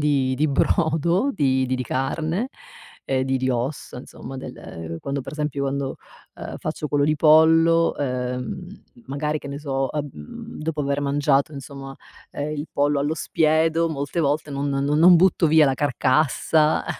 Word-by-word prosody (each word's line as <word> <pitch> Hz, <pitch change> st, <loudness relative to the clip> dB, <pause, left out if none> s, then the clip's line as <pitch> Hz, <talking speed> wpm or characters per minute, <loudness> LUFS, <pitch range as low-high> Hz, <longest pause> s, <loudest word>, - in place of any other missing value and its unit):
di 140 Hz, -3 st, +1 dB
di 150 Hz, +3 st, +1 dB
brodo 165 Hz, -, +1 dB
di 130 Hz, -5 st, +1 dB
di 130 Hz, -, -1 dB
di 130 Hz, -, -2 dB
carne, 160 Hz, -, -2 dB, 0.6 s
ehm, 130 Hz, -1 st, 0 dB
di 135 Hz, 0 st, 0 dB
di 130 Hz, 0 st, 0 dB
ossa 125 Hz, +1 st, -3 dB
insomma 135 Hz, +1 st, -9 dB
del 85 Hz, -9 st, -8 dB
quando 140 Hz, 0 st, -3 dB
per -, -, -8 dB
esempio, 150 Hz, -2 st, -3 dB
quando, 135 Hz, 0 st, -2 dB, 0.4 s
uhm, -, -, -7 dB
faccio 155 Hz, -1 st, -4 dB
quello 145 Hz, -1 st, +2 dB
di 155 Hz, +1 st, +1 dB
pollo, 165 Hz, +2 st, +5 dB
uhm, 125 Hz, +5 st, -3 dB, 0.4 s
magari 150 Hz, +2 st, -2 dB
che 140 Hz, -, -9 dB
ne 140 Hz, -, -5 dB
so, 135 Hz, -2 st, -2 dB
uhm, 145 Hz, -, -7 dB
dopo 155 Hz, 0 st, -3 dB
aver 140 Hz, +1 st, -1 dB
mangiato 140 Hz, +1 st, +1 dB
insomma, 140 Hz, -1 st, -9 dB, 0.4 s
ehm, 150 Hz, +1 st, -4 dB
il 145 Hz, -, -4 dB
pollo 145 Hz, 0 st, +1 dB
allo 145 Hz, +3 st, 0 dB
spiedo 160 Hz, +1 st, +1 dB
molte 145 Hz, +2 st, -3 dB
volte, 150 Hz, +1 st, 0 dB
non 140 Hz, +1 st, -2 dB
non 140 Hz, +2 st, 0 dB
non 175 Hz, +2 st, +8 dB
butto 175 Hz, -1 st, +3 dB
via 155 Hz, 0 st, +5 dB
la 135 Hz, -, +2 dB
carcassa 150 Hz, +3 st, +2 dB
145 Hz, 160 wpm, -23 LUFS, 135-155 Hz, 0.6 s, non